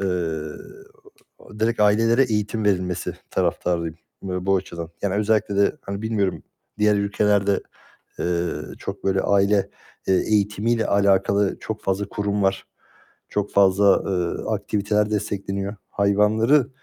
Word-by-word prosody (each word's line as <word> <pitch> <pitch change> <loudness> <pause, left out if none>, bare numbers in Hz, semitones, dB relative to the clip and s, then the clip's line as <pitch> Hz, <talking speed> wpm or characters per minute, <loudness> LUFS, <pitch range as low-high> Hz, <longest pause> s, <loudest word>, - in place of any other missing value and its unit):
eee, 100 - -1 1.5
direkt 115 0 0
ailelere 115 +5 +4
eğitim 105 -1 -1
verilmesi 90 -3 0 0.2
taraftarıyım 85 -2 -1 0.3
bu 95 +1 0
açıdan. 85 -3 -5
Yani 100 -1 0
özellikle 105 -1 +1
de 100 - +3
hani 100 +1 -5
bilmiyorum 105 -4 -1 0.4
diğer 105 0 +3
ülkelerde, 100 0 +1 0.6
eee, 85 0 0 0.3
çok - - -7
böyle 95 0 +2
aile, 100 0 +2 0.4
eee, 95 - +3
eğitimiyle 105 +3 +1
alakalı 100 0 +2
çok 110 -1 -5
fazla 100 +1 -1
kurum 100 0 -1
var, 95 0 0 0.6
çok 105 -1 -2
fazla, 100 0 +4
eee, 90 -3 -2
aktiviteler 105 +1 0
destekleniyor. 100 -1 -3
Hayvanları, 110 +7 +3
100 Hz, 115 wpm, -23 LUFS, 95-105 Hz, 1.5 s, ailelere